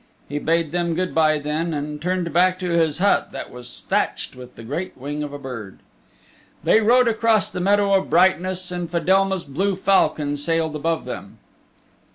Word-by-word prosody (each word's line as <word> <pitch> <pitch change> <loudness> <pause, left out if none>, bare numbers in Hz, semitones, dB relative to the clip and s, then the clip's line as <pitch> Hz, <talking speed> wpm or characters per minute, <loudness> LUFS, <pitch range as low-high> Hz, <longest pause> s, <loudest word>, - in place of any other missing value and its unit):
He 145 +1 -3
bade 165 0 0
them 170 -1 -1
good 185 +1 -2
by 155 -1 +3
then, 155 +3 -2
and 150 0 -5
turned 180 -2 -1
back 185 +2 +3
to 180 -1 -3
his 160 -3 +2
hut 200 +3 +2
that - - -7
was 125 0 -8
thatched - - -1
with 125 0 -12
the 115 - -11
great 150 +10 -5
wing 145 +3 -5
of 145 -1 -4
a 145 - -6
bird. 125 -8 -8 0.9
They 220 - +4
rode 245 +3 +4
across 225 -1 +2
the - - -4
Meadow 200 +2 +3
of 195 -1 +2
Brightness 185 +2 +2
and 175 -2 -4
Fedelma's 190 +2 +1
blue 190 +8 -1
falcon 155 -6 +1
sailed 160 +1 -1
above 165 +2 -1
them. - - -8
170 Hz, 180 wpm, -22 LUFS, 150-185 Hz, 0.9 s, They